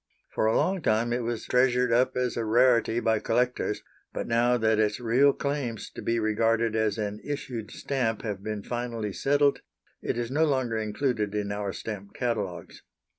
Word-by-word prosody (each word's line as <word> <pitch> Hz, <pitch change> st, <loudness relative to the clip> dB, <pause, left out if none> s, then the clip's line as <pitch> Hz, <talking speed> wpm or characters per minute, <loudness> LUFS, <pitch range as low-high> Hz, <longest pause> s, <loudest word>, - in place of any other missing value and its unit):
For 110 Hz, -, +1 dB
a 110 Hz, -, +2 dB
long 190 Hz, -1 st, +1 dB
time 115 Hz, -1 st, +1 dB
it 125 Hz, -, 0 dB
was 115 Hz, -1 st, -3 dB
treasured 125 Hz, -1 st, +3 dB
up 130 Hz, +2 st, +2 dB
as 125 Hz, -2 st, 0 dB
a 115 Hz, -, -1 dB
rarity 120 Hz, 0 st, +3 dB
by 110 Hz, -2 st, +1 dB
collectors, 120 Hz, -1 st, 0 dB, 0.3 s
but -, -, -4 dB
now 120 Hz, +2 st, +2 dB
that 110 Hz, -1 st, +2 dB
its 105 Hz, +1 st, +1 dB
real 125 Hz, +4 st, +4 dB
claims 140 Hz, -6 st, -3 dB
to -, -, -8 dB
be 115 Hz, -, 0 dB
regarded 115 Hz, +1 st, +1 dB
as 110 Hz, -1 st, +1 dB
an 105 Hz, -1 st, -3 dB
issued 130 Hz, -7 st, -5 dB
stamp 125 Hz, -6 st, -2 dB
have 105 Hz, -4 st, -4 dB
been 105 Hz, 0 st, -4 dB
finally 115 Hz, -3 st, -3 dB
settled, 145 Hz, 0 st, +2 dB, 0.4 s
it -, -, -2 dB
is 120 Hz, 0 st, -3 dB
no 150 Hz, +4 st, +2 dB
longer 130 Hz, -7 st, +1 dB
included 110 Hz, -1 st, -1 dB
in 100 Hz, -1 st, -1 dB
our 100 Hz, -1 st, -2 dB
stamp 100 Hz, -1 st, -7 dB
catalogues. 105 Hz, -8 st, -3 dB
115 Hz, 175 wpm, -27 LUFS, 110-125 Hz, 0.4 s, real